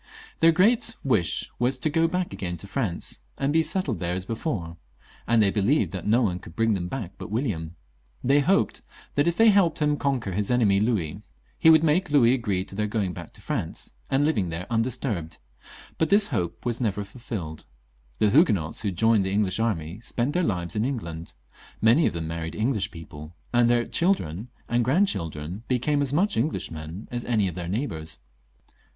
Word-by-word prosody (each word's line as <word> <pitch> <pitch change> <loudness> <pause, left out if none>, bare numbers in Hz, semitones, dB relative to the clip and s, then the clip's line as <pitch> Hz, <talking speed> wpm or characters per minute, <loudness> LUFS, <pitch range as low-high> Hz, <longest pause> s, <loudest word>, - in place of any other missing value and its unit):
Their 165 0 +6
great 220 +6 +3
wish 105 - 0
was 125 +2 +2
to 130 - -1
go 165 +2 +2
back 180 +1 -2
again 90 -2 -4
to 90 - -10
France 100 -5 -2 0.2
and 140 +1 0
be 160 - +5
settled 160 - -1
there 90 0 -1
as 95 0 -4
before, 100 - -4 0.5
and 115 -1 +4
they 100 - +3
believed 110 +10 +2
that 95 -1 -5
no 115 +4 +4
one 90 -4 0
could 85 -2 -13
bring 115 +1 +2
them 90 -3 -2
back 100 -4 -5
but - - -7
William. 100 - -2 0.5
They 140 +3 +4
hoped 190 +8 +1 0.3
that 145 +3 +2
if 170 - +1
they 225 0 +7
helped 195 -6 +4
him 150 -1 +2
to - - -2
conquer 130 -8 -1
his 100 +2 -1
enemy 110 -6 +3
Louis, 100 -8 -1 0.4
he 160 - +6
would 160 0 +7
make 165 +3 +2
Louis 130 -5 +5
agree 100 -7 -1
to - - -11
their 105 +2 -1
going 105 -4 -1
back - - -9
to - - -13
France, - - -4 0.2
and 135 +2 +2
living 105 - +1
there 85 +2 -4
undisturbed; 115 - -1 0.6
but 160 - +2
this 205 +1 +5
hope 85 +5 -3
was 120 0 -1
never 105 -3 0
ful 100 +5 -14
filled. 85 -10 -6 0.5
The 105 +9 +3
Huguenots 105 - +3
who 105 - -2
had 95 -4 -3
joined 110 -2 +4
the 95 - -2
English 100 0 0
army 95 -5 -2
spent 120 +4 -2
their 180 - +1
lives 90 - -2
in 105 - +1
England; 85 -11 -4 0.4
many 115 +9 +4
of - - -2
them 85 -1 -4
married 80 0 -4
Eng 115 +6 +1
lish 100 -5 -1
people, 80 -1 -11 0.2
and 120 -1 +4
their 120 -1 +3
children 115 - 0 0.2
and 120 0 +1
grandchildren 95 - 0
became 140 +4 +1
as 140 -2 +1
much 190 +8 +1
Englishmen 85 - -3
as 120 -1 -3
any 110 -5 +1
of 90 - -4
their 85 0 -5
neighbours. 90 - -3
115 Hz, 200 wpm, -25 LUFS, 90-140 Hz, 0.6 s, they